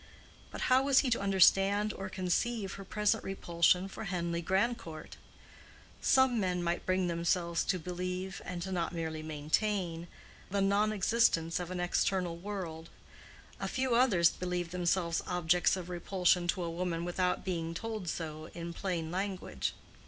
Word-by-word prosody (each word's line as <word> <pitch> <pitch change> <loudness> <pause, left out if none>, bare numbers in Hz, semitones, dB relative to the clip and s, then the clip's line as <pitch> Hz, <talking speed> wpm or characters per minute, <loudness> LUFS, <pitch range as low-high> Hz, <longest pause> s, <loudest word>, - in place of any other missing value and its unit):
But - - -7
how 255 +1 +4
was 275 -1 +5
he 260 - -1
to 230 - +2
understand 195 +1 +4
or 190 -1 -6
conceive 195 +3 -1
her 195 - -8
present 210 +1 0
repulsion 180 -1 +2
for 205 +3 -7
Henleigh 170 -3 -2
Grandcourt? 190 -2 -2 0.8
Some 260 -3 +4
men 180 -3 0 0.2
bring 185 0 +2
themselves 170 0 0
to 185 - +1
believe, 180 +2 -4
and 175 -1 -5
not 170 -2 -1
merely 160 -1 -3
maintain, 165 +3 -1 0.4
the 200 +1 0
non 200 +2 +3
existence 185 -5 +2
of 175 -1 -5
an 185 -1 -4
external 175 0 0
world; 170 -3 -6 0.7
a - - -2
few 260 -1 0
others 215 -9 +5
believe 180 -1 -3
themselves 175 -1 0
objects 180 0 +2
of 180 -2 -6
repulsion 180 0 +1
to 175 +1 0
a 170 - -3
woman 170 0 -2
without 180 +1 0
being 165 -3 -2
told 215 -3 -4
so 155 -1 -5
in 170 0 -5
plain 170 -4 -3
language. 185 - -3
180 Hz, 145 wpm, -32 LUFS, 170-195 Hz, 0.8 s, was